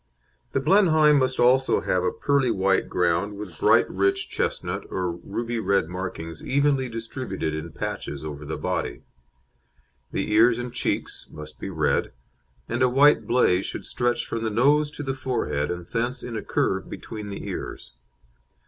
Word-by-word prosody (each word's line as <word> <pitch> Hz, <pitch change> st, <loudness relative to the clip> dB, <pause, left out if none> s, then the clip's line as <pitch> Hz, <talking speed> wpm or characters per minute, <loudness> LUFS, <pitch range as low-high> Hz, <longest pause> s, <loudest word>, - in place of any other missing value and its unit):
The -, -, +2 dB
Blenheim 155 Hz, -2 st, +5 dB
must 130 Hz, -1 st, 0 dB
also 130 Hz, +2 st, +4 dB
have 90 Hz, -1 st, 0 dB
a 90 Hz, -, +1 dB
pearly 140 Hz, -3 st, +1 dB
white 95 Hz, -3 st, +1 dB
ground 90 Hz, +4 st, 0 dB
with 100 Hz, -6 st, -8 dB
bright -, -, +5 dB
rich 100 Hz, +1 st, 0 dB
chestnut -, -, -2 dB
or 90 Hz, -2 st, -1 dB
ruby 115 Hz, +7 st, -4 dB
red 100 Hz, -5 st, +1 dB
markings 85 Hz, -3 st, -6 dB
evenly 140 Hz, -2 st, +1 dB
distributed 115 Hz, -7 st, -4 dB
in 80 Hz, +2 st, -5 dB
patches 75 Hz, 0 st, -5 dB
over 75 Hz, -1 st, -6 dB
the 75 Hz, +2 st, -4 dB
body. -, -, -3 dB, 1.1 s
The -, -, -2 dB
ears 115 Hz, +2 st, +5 dB
and 120 Hz, 0 st, -5 dB
cheeks -, -, -2 dB
must 75 Hz, 0 st, -10 dB
be -, -, -5 dB
red, 80 Hz, -5 st, 0 dB, 0.5 s
and 120 Hz, +2 st, -2 dB
a 130 Hz, -, +5 dB
white 140 Hz, +4 st, +5 dB
blaze 100 Hz, -7 st, +3 dB
should -, -, -6 dB
stretch 120 Hz, 0 st, 0 dB
from 115 Hz, -, -4 dB
the 110 Hz, -, 0 dB
nose 145 Hz, +7 st, +3 dB
to 145 Hz, 0 st, -7 dB
the 135 Hz, -1 st, -2 dB
forehead 75 Hz, -, -2 dB
and 90 Hz, 0 st, -4 dB
thence 120 Hz, +5 st, -2 dB
in 120 Hz, -, -5 dB
a 110 Hz, -, -2 dB
curve -, -, -1 dB
between 105 Hz, -2 st, -7 dB
the 100 Hz, -, -6 dB
ears. -, -, -6 dB
110 Hz, 165 wpm, -25 LUFS, 90-130 Hz, 1.1 s, Blenheim